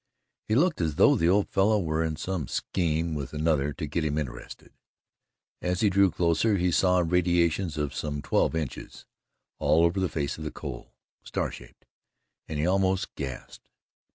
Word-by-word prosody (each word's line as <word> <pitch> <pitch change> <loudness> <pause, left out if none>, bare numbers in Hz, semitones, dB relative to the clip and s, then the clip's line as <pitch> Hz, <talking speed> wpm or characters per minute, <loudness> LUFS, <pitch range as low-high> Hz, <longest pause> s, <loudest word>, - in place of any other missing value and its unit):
It 110 - +3
looked 165 - +2
as 80 -3 -1
though - - +5
the 85 +1 +2
old 100 +2 +3
fellow 105 +2 +2
were 80 -3 0
in 80 -1 -2
some 80 -2 -3
scheme 85 -2 -1
with 70 -2 -5
another 75 -2 +1
to 75 - -5
get 80 +2 -2
him 75 -1 -1
interested. 65 -5 -6 0.9
As 90 0 -1
he 105 -3 +3
drew 100 0 +4
closer, 90 +5 +1
he 90 0 +1
saw 90 +1 +3
radiations 85 -1 +1
of 75 -2 -2
some 75 0 -4
twelve 80 - +1
inches, 75 -6 -5 0.5
all 80 +2 +4
over 85 +3 +1
the 95 -2 0
face 75 0 -3
of - - -6
the 75 - -3
coal, - - -8 0.3
star - - -3
shaped, - - -13 0.6
and 80 - -4
he 75 - 0
almost 95 0 +1
gasped. 65 -2 -8
85 Hz, 175 wpm, -27 LUFS, 75-95 Hz, 0.9 s, though